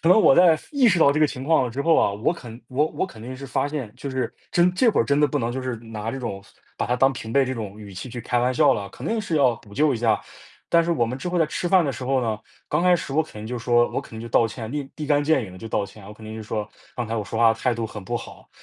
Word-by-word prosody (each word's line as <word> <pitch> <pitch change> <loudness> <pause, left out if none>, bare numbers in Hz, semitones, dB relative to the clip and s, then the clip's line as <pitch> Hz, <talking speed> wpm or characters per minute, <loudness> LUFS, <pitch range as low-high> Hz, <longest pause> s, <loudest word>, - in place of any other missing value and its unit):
可 165 - +2
能 185 +5 +7
我 135 - +6
在， 170 -3 +6
意 270 -5 +5
识 175 -3 +3
到 140 - +6
这 155 - 0
个 155 - +6
情 130 -2 -7
况 135 -5 +3
之 140 +4 -3
后 165 +1 +4
啊， - - +3
我 105 +11 0
肯 120 -7 -10
我 140 +4 +1
我 - - -2
肯 110 - -13
定 130 +3 -7
是 135 +1 -8
发 135 +1 0
现， 135 -8 -5
就 140 - -6
是， 130 -3 -2 0.2
真 175 +1 +3
这 235 +5 +3
会 - - +2
儿 - - +2
真 140 +4 +2
的 150 - +5
不 145 +1 -1
能 115 -1 -1
就 130 - -3
是 130 -2 -3
拿 110 -1 -6
这 135 - -5
种 100 -6 -5 0.3
把 - - -1
他 125 +1 +1
当 135 +2 +4
平 115 -2 -7
辈 140 -1 +4
这 130 0 -3
种 105 -2 -6
语 100 -2 -10
气 95 +7 -6
去 120 0 -6
开 120 - 0
玩 125 +1 +2
笑 - - +5
了， 100 -1 -4
肯 - - -8
定 225 0 0
是 170 -6 -2
要 130 -5 +4
补 105 -3 -16
救 150 0 +3
一 - - -1
下。 115 -1 +2 0.5
但 170 0 +5
是 170 - -1
我 135 -8 +2
们 125 +3 -4
之 180 - -4
后 175 0 0
在 165 - +4
吃 170 +3 -3
饭 185 -3 +5
的 140 - -1
时 125 - -8
候 130 0 +1
呢， 110 -2 -1 0.3
刚 - - 0
开 180 -1 +5
始 140 - -6
我 160 - +3
肯 155 - -14
定 110 - -7
就 125 +1 -4
说 120 0 +3
我 - - -2
肯 - - -15
定 110 - -7
就 115 - -6
道 115 - +4
歉， 110 +1 -7
立 145 -2 -3
立 150 -2 -4
竿 145 0 +3
见 145 -4 +2
影 95 - -10
地 95 - -11
就 115 - -8
道 105 - 0
歉。 100 -1 -13
我 105 - -10
肯 110 0 -13
定 110 0 -7
就 110 - -6
说， 105 -1 -3 0.3
刚 120 -2 -2
才 115 - -3
我 110 - -1
说 110 +2 -5
话 115 -1 +6
态 120 +2 0
度 115 -1 -3
很 105 -2 -8
不 - - -3
好， - - -10
125 Hz, 360 characters per minute, -24 LUFS, 110-150 Hz, 0.5 s, 能